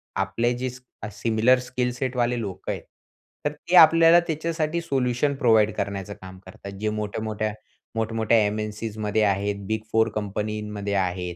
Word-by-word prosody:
आपले 115 +5 0
जे 130 +1 -2
स 125 +1 -11 0.3
सिमिलर 115 +4 +2
स्किल 125 0 -2
सेट 130 +1 -3
वाले 120 0 +1
लोक 95 -3 -6
आहेत. - - -3 0.6
तर 150 - +1
ते 150 +4 -3
आपल्याला 165 +1 +8
त्याच्यासाठी 160 +1 -1
सोल्युशन 135 -1 0
प्रोव्हाईड 110 -5 +4
करण्याचं 100 -1 -4
काम 95 0 -10
करतात. 100 +1 -10
जे 110 +1 0
मोठ्या-मोठ्या 105 0 -3 0.4
मोठ-मोठ्या 115 0 +1
एम-एन-सीमध्ये 105 0 -2
आहेत, 100 0 +1
बिग 110 0 -1
फोर 110 0 +3
कंपनीमध्ये 105 0 -3
आहेत. 90 -2 -1
110 Hz, 145 wpm, -24 LUFS, 105-125 Hz, 0.6 s, आपल्याला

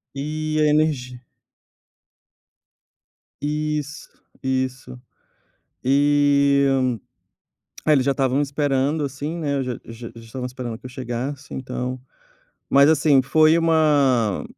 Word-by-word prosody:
E 155 +2 -2
a - - +4
energi 145 -5 0 2.2
Isso, 150 0 -3 0.3
isso. 130 -1 -3 0.9
E 140 0 +3 1.2
é, 155 - +3
eles 135 -3 +2
já 140 - +3
estavam 135 0 +1
esperando, 145 +1 0
assim, 145 +4 -5
né, 145 -4 -1
eu 135 - -1
já 125 -1 -3
já 115 +1 -9
já 115 - -11
estavam 125 +3 -7
esperando 125 -2 -6
que 125 - -20
eu - - -6
chegasse, 130 +3 -5
então. 125 0 -4 0.7
Mas, 140 +1 +6
assim, 150 -3 +4
foi 155 +4 +4
uma 145 -9 +2
140 Hz, 110 wpm, -22 LUFS, 130-150 Hz, 2.2 s, Mas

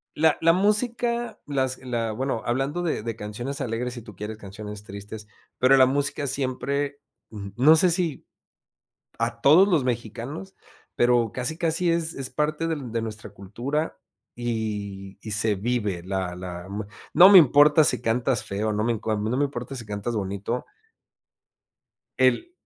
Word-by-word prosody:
La 160 0 +3
la 165 0 +6
música, 235 +5 0
las 130 -2 -1
la, 120 -3 -3
bueno, 130 0 -2
hablando 135 +8 -1
de 155 -10 -1
de 115 0 -4
canciones 120 +7 -5
alegres, 120 0 -3
si 120 - -7
tú 105 - -12
quieres 105 +2 -6
canciones 105 0 -9
tristes, 105 +1 -9 0.3
pero 135 +2 +5
la 130 - +7
música 145 +2 -1
siempre 140 +2 -1 0.3
Ujú. 100 -2 -7
No 155 +6 +6
sé 180 +2 +5
si, 170 -4 -1 0.9
a 115 0 -2
todos 175 +8 +7
los 160 -8 +2
mexicanos, 125 - -4 0.4
pero, 120 -2 +2
casi 130 +6 -2
casi, 170 +1 +1
es 165 -1 0
es 135 -1 -4
parte 155 +2 -1
del 145 -8 -4
de 115 -1 -1
nuestra 110 -1 -6
cultura, 120 - -4 0.4
y 105 -5 -4
y 110 - -6
se 105 +1 +1
vive 105 -4 -2
la 95 -1 -3
la, 90 -1 -7
m 100 +1 -5 0.3
No 180 +2 +9
me 200 - +9
importa 150 0 +6
si 125 - +3
cantas 120 +2 0
feo, 105 +2 -2
no 105 +1 -1
me 120 - +2
inco 110 0 -4
a 110 - +1
mí 105 - -2
no 125 - 0
me 145 - +2
importa 135 -1 -5
si 115 - -5
cantas 105 +3 -4
bonito 100 +4 -3 1.5
El 345 +1 +2
120 Hz, 165 wpm, -25 LUFS, 105-145 Hz, 1.5 s, No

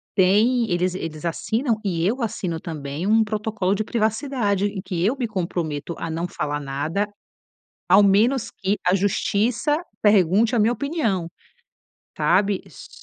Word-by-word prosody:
tem 220 +5 +3
eles 180 +1 0
eles 165 -3 -6
assinam 225 - -1
e 170 -4 -1
eu 240 +7 0
assino 180 -7 -2
também 150 +1 -5
um 220 +1 +4
protocolo 215 -2 -1
de 210 +2 -1
privacidade 220 -2 0
em 200 -2 -3
que 180 -3 -3
eu 230 +8 +2
me 250 -3 -1
comprometo 170 -6 -3
a 165 - -4
não 165 +2 -2
falar 145 -3 -3
nada, 150 +9 -2 0.8
ao 190 +3 +7
menos 225 +5 +3
que 195 +1 -1
a 180 - +4
Justiça 220 - +1 0.2
pergunte 205 +3 +4
a - - +2
minha 220 +3 +3
opinião, 245 - -1 0.9
sabe. 200 -2 +2
S - - -13
200 Hz, 145 wpm, -23 LUFS, 175-220 Hz, 0.9 s, ao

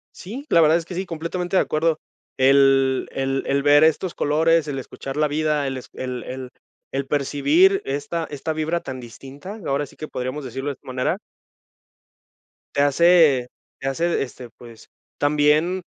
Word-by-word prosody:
Sí, 235 +10 -8
la 170 - +5
verdad 160 +1 +5
es 170 - -5
que 180 - -8
sí, 190 +2 -2
completamente 175 +2 -4
de - - +5
acuerdo. 160 +1 0 0.4
El 135 0 +4
el 135 0 -1
el 140 0 +1
ver 145 +1 +6
estos 160 +3 +2
colores, 160 +1 +2
el 140 -2 -3
escuchar 135 +1 -7
la 150 0 +3
vida, 150 -1 0
el 135 -1 -3
es 130 - -10
el 125 -1 -5
el 130 0 -7 0.4
el 135 0 -3
percibir 145 +7 +3
esta 145 +4 -3
esta 150 +2 -4
vibra 155 +2 -1
tan 130 -1 -7
distinta, 135 - -10
ahora 140 +1 0
sí - - -18
que 155 - -7
podríamos 130 +3 -4
decirlo 135 +3 -4
de - - -2
esta 130 - -23
manera 125 0 -1 1.6
te 140 - +3
hace 145 -3 +5 0.3
te 135 - -4
hace, 165 +5 0
este, 125 -2 -9
pues, 115 -2 -14 0.3
también 150 +5 +2
145 Hz, 170 wpm, -22 LUFS, 135-165 Hz, 1.6 s, ver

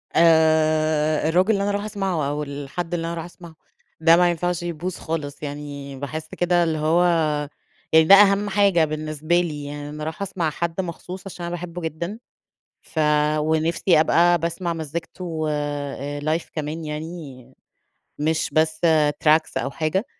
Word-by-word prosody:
آآ 155 -1 +3
الراجل 185 +6 +3
اللي 200 -2 +1
أنا 205 - 0
رايحه 205 +1 -2
أسمعه 190 -8 -2
أو 150 +1 -2
الحد 145 +5 -5
اللي 165 -1 -2
أنا 170 - -3
رايحه 165 0 -5
أسمعه، 170 -2 -13 0.5
ده 165 +1 +6
ما 175 0 +4
ينفعش 175 +1 -1
يبوظ 175 +1 -4
خالص، 150 -3 -5
يعني 145 -1 -6
باحس 155 +3 -5
كده 175 -1 +2
اللي 160 -2 0
هو 160 +3 +2 0.9
يعني 160 0 +7
ده 195 - +9
أهم 205 0 +5
حاجة 190 -5 +3
بالنسبة 155 +2 -1
لي، 150 -4 -4
يعني 145 0 -6
أنا 150 0 -7
رايحه 160 +6 -4
أسمع 175 -4 -2
حد 170 +4 -2
مخصوص 180 +1 -7
عشان 175 -2 -7
أنا 170 - -4
باحبه 175 0 -7
جدًا، 170 +7 -4 0.6
ف 160 - -6 0.4
ونفسي 160 +2 +2
أبقى 175 +2 +4
باسمع 170 +1 -2
مزيكته 165 +1 -5
آآ 145 -1 -3
live 155 +3 -1
كمان 155 +1 -4
يعني 150 -5 -7 0.7
مش 160 +1 0
بس 155 0 +1 0.4
tracks 155 +1 +3
أو 135 +3 -2
حاجة، 175 - -1
160 Hz, 155 wpm, -23 LUFS, 150-175 Hz, 0.9 s, ده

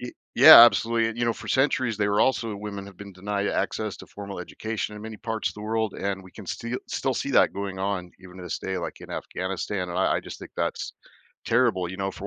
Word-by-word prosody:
Y 125 - -7 0.2
Yeah, - - +11
absolutely, 115 -1 +2
and 115 +1 -6
you 120 - +1
know, 115 - +2
for - - -10
centuries, 130 -4 +1
they 105 -1 +1
were 100 +1 +2
also 115 -4 +1
women 100 -1 -6
have 100 -2 -13
been 100 -1 -10
denied 100 +2 -2
access - - -2
to - - -11
formal 100 -2 -8
education 110 +4 -5
in 105 - -9
many 110 0 -7
parts 110 0 -2
of - - -9
the 105 - -9
world, 110 -1 -1
and 100 -1 -3
we 95 - -14
can 105 -4 -12
stee 115 +5 -4
still 130 -1 -1
see 140 - -3
that - - +4
going 100 -1 -5
on, 95 -2 -2
even 90 0 -13
to 90 - -9
this 90 - -4
day, 95 0 -4
like, - - -6
in - - -11
Afghanistan, 95 0 -4
and 90 +1 -3
I 95 - +2
I - - -2
just - - -9
think - - -11
that's - - -2 0.5
terrible, 115 -7 +2
you 95 - -7
know 95 0 -2
for 100 - -8
100 Hz, 250 wpm, -25 LUFS, 95-115 Hz, 0.5 s, Yeah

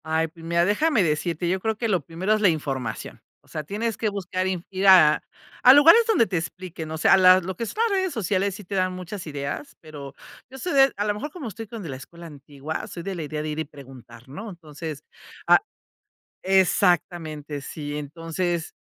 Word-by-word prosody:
Ay, 160 +1 0
pues 165 +1 -16
mira, 170 +1 +1
déjame 225 - +2
decirte, 165 +2 -1
yo 185 +2 0
creo 220 +2 -2
que 230 - -1
lo 190 -6 +1
primero 170 +8 -1
es 215 - 0
la 205 - +5
información. 135 -8 -4 0.2
O - - -27
sea, 155 - -5
tienes 215 +7 -3
que 220 - 0
buscar 185 -2 -3
inf 180 -2 -3
ir 195 +1 -1
a 165 -6 +7 0.4
a 255 - +10
lugares 325 +11 +8
donde 395 - +3
te 180 - -1
expliquen, 165 -1 -6
o 160 - -4
sea, 195 - +5
la 185 0 +7
lo 185 +1 -5
que 230 - -3
son - - -7
las 400 -3 0
redes 375 -3 -2
sociales 200 -3 0
sí 205 - -10
te 195 +2 -6
dan 185 -1 +1
muchas 185 +1 -7
ideas, 145 -1 -5
pero 145 -3 -10 0.4
yo 265 - -11
soy 355 +6 -3
de 270 -1 +5
a 205 - -2
lo 210 - +1
mejor, 290 +9 -6
como 300 -6 -7
estoy 225 +2 -8
con 225 +1 -8
de 165 - -7
la 135 - -5
escuela 170 +5 -12
antigua, 145 0 -7
soy 170 - -8
de 195 +1 -4
la 170 - -4
idea 150 0 -4
de 155 - -4
ir 150 +1 -4
y 160 - -2
preguntar, 130 -5 -14
¿no? 205 +11 -7
Entonces, 155 -4 -8 0.4
ah, - - +7 0.8
exactamente, 175 -5 +1
sí. 145 +1 -6
Entonces, 165 +3 -3
175 Hz, 215 wpm, -24 LUFS, 155-205 Hz, 0.8 s, a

